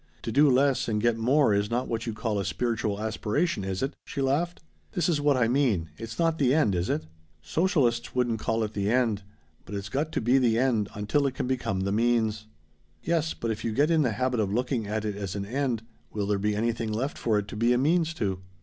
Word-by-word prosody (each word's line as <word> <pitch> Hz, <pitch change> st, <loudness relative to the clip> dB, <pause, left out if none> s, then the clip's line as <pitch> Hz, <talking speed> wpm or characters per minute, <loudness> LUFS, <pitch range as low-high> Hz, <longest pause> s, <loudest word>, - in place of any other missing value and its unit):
To 115 Hz, -, -3 dB
do 145 Hz, +4 st, +5 dB
less 135 Hz, +1 st, +3 dB
and 105 Hz, -2 st, 0 dB
get 120 Hz, +1 st, +2 dB
more 125 Hz, +1 st, +3 dB
is 100 Hz, +1 st, +1 dB
not 120 Hz, +2 st, -1 dB
what 115 Hz, 0 st, -3 dB
you'd 115 Hz, -, -3 dB
call 110 Hz, -2 st, -1 dB
a -, -, -1 dB
spiritual 110 Hz, -2 st, -1 dB
aspiration, 110 Hz, -, -1 dB
is 95 Hz, +2 st, -2 dB
it?" 135 Hz, -, -2 dB
she 140 Hz, -, -6 dB
laughed. 145 Hz, +6 st, 0 dB, 0.3 s
"This 175 Hz, -4 st, +1 dB
is 160 Hz, -5 st, +1 dB
what 145 Hz, -2 st, +3 dB
I 120 Hz, -2 st, +3 dB
mean 115 Hz, -, +1 dB
it's 115 Hz, +3 st, -8 dB
not 165 Hz, -1 st, +1 dB
the 135 Hz, -1 st, +3 dB
end, 150 Hz, -11 st, +3 dB
is 90 Hz, 0 st, -1 dB
it?" 80 Hz, -, -1 dB, 0.4 s
"Socialists 130 Hz, -, +1 dB
wouldn't 120 Hz, -3 st, +1 dB
call 115 Hz, +1 st, 0 dB
it 105 Hz, 0 st, -4 dB
the 100 Hz, -1 st, -1 dB
end. 115 Hz, -4 st, +2 dB, 0.4 s
But 105 Hz, -, -7 dB
it's 100 Hz, +1 st, -5 dB
got 150 Hz, +4 st, -1 dB
to -, -, +1 dB
be 125 Hz, +3 st, +3 dB
the 115 Hz, -3 st, +2 dB
end 115 Hz, -5 st, +1 dB
until 105 Hz, +8 st, +1 dB
it 135 Hz, -, -4 dB
can -, -, -2 dB
become 125 Hz, -7 st, -1 dB
the 100 Hz, +1 st, -1 dB
means." 110 Hz, -1 st, +1 dB, 0.6 s
"Yes, 160 Hz, -1 st, 0 dB
but 115 Hz, -, -2 dB
if 110 Hz, 0 st, -4 dB
you 115 Hz, -, -1 dB
get 145 Hz, +7 st, +2 dB
in 160 Hz, -2 st, +4 dB
the 125 Hz, -6 st, +1 dB
habit 125 Hz, +2 st, 0 dB
of 100 Hz, -3 st, 0 dB
looking 120 Hz, -1 st, -1 dB
at 110 Hz, +1 st, -2 dB
it 105 Hz, -2 st, -2 dB
as 100 Hz, -2 st, -5 dB
an 100 Hz, -1 st, -3 dB
end, 125 Hz, 0 st, -1 dB, 0.3 s
will 105 Hz, -2 st, -2 dB
there 100 Hz, 0 st, 0 dB
be 105 Hz, +1 st, 0 dB
anything 115 Hz, 0 st, -1 dB
left 130 Hz, +8 st, -2 dB
for 110 Hz, -3 st, +1 dB
it 105 Hz, -1 st, -2 dB
to -, -, -7 dB
be 115 Hz, +3 st, +2 dB
a 125 Hz, -, +4 dB
means 165 Hz, +4 st, +2 dB
to?" 95 Hz, -, -2 dB
115 Hz, 240 wpm, -27 LUFS, 105-135 Hz, 0.6 s, do